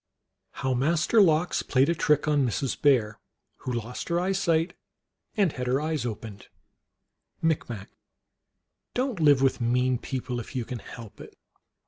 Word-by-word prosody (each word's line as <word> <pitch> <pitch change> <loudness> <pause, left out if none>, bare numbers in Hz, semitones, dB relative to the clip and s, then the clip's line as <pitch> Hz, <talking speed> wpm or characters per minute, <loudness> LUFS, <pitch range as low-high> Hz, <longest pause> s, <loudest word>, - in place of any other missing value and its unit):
How 130 -1 -1
Master 165 - +3
Lox 170 -2 +3
played 135 +1 +2
a 170 - +2
Trick 150 -2 +1
on 145 -2 +3
Mrs. 125 +2 -2
Bear, 115 -7 +3 0.4
who 130 - -5
lost 120 0 -5
her 170 0 +1
eyesight 180 -3 +1 0.6
and 195 -6 +3
had 125 -2 -5
her 130 +2 +2
eyes 155 -5 -2
opened. 105 -2 -7 0.9
(Micmac.) 120 -10 -2 1.0
Don 255 -3 -1
t 165 - -1
live 145 -3 +5
with 135 -2 +2
mean 125 +1 +1
people 125 -1 -4
if 120 - -9
you 125 -3 -2
can 125 0 -6
help 115 -3 -11
it. - - -13
135 Hz, 150 wpm, -27 LUFS, 125-160 Hz, 1.0 s, live